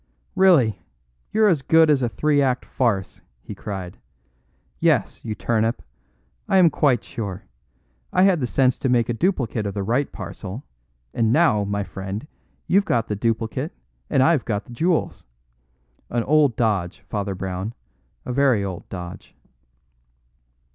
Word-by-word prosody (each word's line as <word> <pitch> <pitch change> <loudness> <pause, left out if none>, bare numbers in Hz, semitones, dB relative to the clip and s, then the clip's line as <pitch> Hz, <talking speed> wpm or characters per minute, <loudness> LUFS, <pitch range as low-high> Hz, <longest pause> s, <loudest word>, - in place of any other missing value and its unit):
"Really, 135 - +4 0.5
you're 220 0 +4
as 165 -8 +2
good 160 +2 +5
as 140 -3 +3
a 120 - +1
three 145 +4 +1
act 130 -2 0
farce," 110 -7 -1 0.2
he - - -9
cried. 95 -3 -7 0.8
"Yes, - - +1
you 110 -2 -4
turnip, 115 +1 0 0.7
I 195 - +4
am 175 -4 +6
quite 130 -6 +2
sure. 100 -5 -6 0.7
I 185 - +3
had 190 -4 +4
the 125 - -1
sense 130 0 +2
to 130 - 0
make 120 -1 +2
a - - +1
duplicate 120 - -1
of 100 - -5
the 100 - -2
right 125 +7 0
parcel, 100 +3 -7 0.5
and 115 -1 +1
now, 120 -9 +3
my 100 0 -2
friend, 95 +5 -6 0.4
you've 200 +2 +3
got 115 - 0
the 105 - -1
duplicate 115 +1 -2 0.4
and 130 - +3
I've 155 -2 +3
got 105 -3 -2
the 120 - -12
jewels. 165 - -1 0.8
An 120 -1 0
old 145 -3 +3
dodge, 100 -6 -1
Father 100 -2 -4
Brown 95 +4 -4 0.5
a 125 - -3
very 130 -6 +3
old 95 -3 -6
dodge." 90 -2 -8
115 Hz, 150 wpm, -23 LUFS, 100-145 Hz, 0.8 s, am